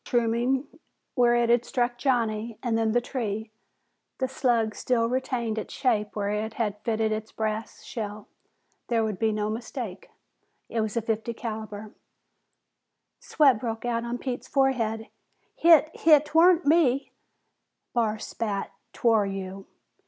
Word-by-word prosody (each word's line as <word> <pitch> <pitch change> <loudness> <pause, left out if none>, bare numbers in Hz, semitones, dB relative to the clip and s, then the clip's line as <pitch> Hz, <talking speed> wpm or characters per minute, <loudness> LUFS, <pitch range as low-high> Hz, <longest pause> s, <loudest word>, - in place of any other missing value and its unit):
Mushrooming 240 +3 +1 0.5
where 240 -1 +4
it 235 -1 +3
had 240 0 +4
struck 245 -1 -1
Johnny 230 -4 0
and 240 -3 0
then 225 -1 +1
the 240 - +3
tree, 220 -4 -4 0.7
the 260 - 0
slug 240 -4 +1
still 235 0 +1
retained 240 -3 -1
its - - -7
shape 215 -6 0
where 205 -1 -1
it 215 +1 -3
had 210 -3 -2
fitted 220 -1 0
its 215 0 -3
brass 220 0 -4
shell. 210 -2 -6 0.6
There 230 -2 +1
could 210 -4 -3
be 220 -1 +2
no 210 0 -1
mistake; 225 -3 -6 0.6
it 230 - -1
was 215 0 -2
fifty 225 +1 -2
caliber. 215 -2 -6 1.3
Sweat 275 -7 +3
broke 225 0 -4
out 235 -1 0
on 235 +1 -3
Pete's 250 0 -5
forehead. 230 -5 +1 0.5
"Hit 320 -2 +6
Hit 305 -2 +5
'Twarn't 335 +3 +5
me!" 285 -4 +3 0.8
Barr 220 -3 +1
spat, 210 -2 -3 0.2
"'Twar 220 -4 +3
you!" 195 0 -6
230 Hz, 135 wpm, -26 LUFS, 215-250 Hz, 1.3 s, Hit